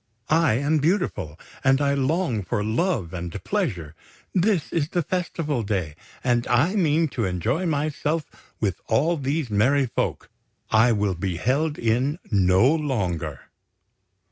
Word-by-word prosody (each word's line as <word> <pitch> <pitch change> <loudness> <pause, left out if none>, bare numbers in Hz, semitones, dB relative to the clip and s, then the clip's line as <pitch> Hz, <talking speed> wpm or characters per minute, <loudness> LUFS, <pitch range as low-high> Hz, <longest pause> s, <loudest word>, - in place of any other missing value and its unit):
I 160 -6 +4
am 145 +5 +1
beautiful, 150 - -1 0.2
and 135 0 +4
I 140 -1 +2
long 140 - 0
for 100 +3 -2
love 110 - -1
and 85 -1 -5
pleasure! 80 -4 -2 0.4
This 185 -3 +1
is 155 -2 0
a 175 - +2
Festival 160 -6 -2
Day, 95 -8 -2 0.3
and 120 -1 +1
I 145 - +3
mean 165 -5 +2
to 120 -5 -2
enjoy 110 - -1
myself 150 +1 -1 0.3
with 95 -5 -1
all 150 +10 +2
these 140 -3 -2
merry 130 +7 +3
folk! 120 - -3 0.4
I 115 +2 +5
will 105 -3 +1
be 90 0 -3
held 145 - 0
in 125 +7 +1
no 95 +6 +4
longer!" 90 - -2
130 Hz, 140 wpm, -24 LUFS, 100-155 Hz, 0.4 s, I